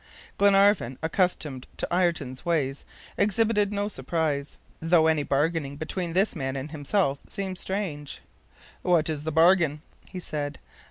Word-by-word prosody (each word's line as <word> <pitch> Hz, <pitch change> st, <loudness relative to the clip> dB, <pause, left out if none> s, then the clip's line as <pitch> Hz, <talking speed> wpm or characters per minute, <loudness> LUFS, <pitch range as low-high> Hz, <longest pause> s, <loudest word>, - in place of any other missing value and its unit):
Glenarvan, 200 Hz, -, +4 dB
accustomed 160 Hz, -6 st, -1 dB
to -, -, -2 dB
Ayrton's 165 Hz, -8 st, 0 dB
ways, 145 Hz, -5 st, -1 dB, 0.3 s
exhibited 210 Hz, 0 st, +2 dB
no 205 Hz, 0 st, -1 dB
surprise, 155 Hz, -8 st, -2 dB, 0.2 s
though 165 Hz, 0 st, +4 dB
any 160 Hz, -2 st, +3 dB
bargaining 145 Hz, 0 st, 0 dB
between 165 Hz, +2 st, -3 dB
this 195 Hz, +4 st, +2 dB
man 135 Hz, 0 st, -3 dB
and 135 Hz, +3 st, -5 dB
himself 145 Hz, -1 st, 0 dB
seemed 190 Hz, -2 st, -4 dB
strange. 170 Hz, -8 st, -3 dB, 0.6 s
"What 165 Hz, -3 st, +2 dB
is 150 Hz, -1 st, -5 dB
the 160 Hz, -, -1 dB
bargain?" 165 Hz, -2 st, +4 dB, 0.3 s
he 185 Hz, -, -5 dB
said. 145 Hz, -4 st, -4 dB
160 Hz, 130 wpm, -26 LUFS, 145-190 Hz, 0.6 s, Glenarvan